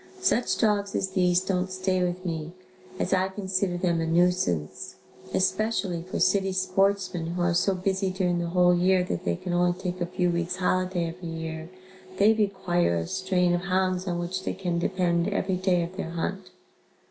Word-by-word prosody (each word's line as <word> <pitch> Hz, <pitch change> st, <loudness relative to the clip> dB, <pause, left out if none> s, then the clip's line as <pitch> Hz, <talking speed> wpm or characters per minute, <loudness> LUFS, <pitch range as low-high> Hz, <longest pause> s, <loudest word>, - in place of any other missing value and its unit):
Such 250 Hz, -10 st, +1 dB
dogs 205 Hz, -3 st, +1 dB
as 190 Hz, -, 0 dB
these 180 Hz, -2 st, +3 dB
don't 185 Hz, -1 st, -1 dB
stay 185 Hz, 0 st, 0 dB
with 180 Hz, +1 st, -3 dB
me, 165 Hz, -1 st, -4 dB, 0.4 s
as 185 Hz, -, -1 dB
I 190 Hz, 0 st, +2 dB
consider 190 Hz, -2 st, -1 dB
them 175 Hz, -2 st, +1 dB
a 165 Hz, -, -1 dB
nuisance, 165 Hz, -, 0 dB, 0.4 s
especially 190 Hz, -2 st, 0 dB
for 180 Hz, +2 st, -5 dB
city 190 Hz, +1 st, +2 dB
sportsmen, 185 Hz, -2 st, +1 dB
who 175 Hz, +1 st, -2 dB
are 175 Hz, 0 st, +2 dB
so 190 Hz, +3 st, +2 dB
busy 190 Hz, +1 st, 0 dB
during 180 Hz, -2 st, 0 dB
the 170 Hz, -, -2 dB
whole 180 Hz, +1 st, +4 dB
year 180 Hz, +1 st, +3 dB
that 90 Hz, -, -4 dB
they 85 Hz, -, +1 dB
can 175 Hz, -, -5 dB
only 175 Hz, 0 st, +2 dB
take 180 Hz, -1 st, -4 dB
a 175 Hz, -, 0 dB
few 180 Hz, 0 st, 0 dB
weeks 170 Hz, +1 st, -1 dB
holiday 185 Hz, -1 st, 0 dB
every 170 Hz, 0 st, -8 dB
year, 160 Hz, 0 st, -5 dB, 0.5 s
they 210 Hz, +3 st, +5 dB
require 190 Hz, -, +1 dB
a 85 Hz, -1 st, -1 dB
strain 180 Hz, -, +1 dB
of 175 Hz, +1 st, -1 dB
hounds 185 Hz, 0 st, 0 dB
on 175 Hz, -1 st, -1 dB
which 180 Hz, +2 st, -3 dB
they -, -, -3 dB
can 180 Hz, -2 st, -2 dB
depend 175 Hz, -1 st, +1 dB
every 200 Hz, -2 st, 0 dB
day 180 Hz, -2 st, +2 dB
of 175 Hz, +2 st, -7 dB
their 180 Hz, -, -3 dB
hunt. 180 Hz, +3 st, -4 dB
180 Hz, 185 wpm, -26 LUFS, 175-190 Hz, 0.5 s, they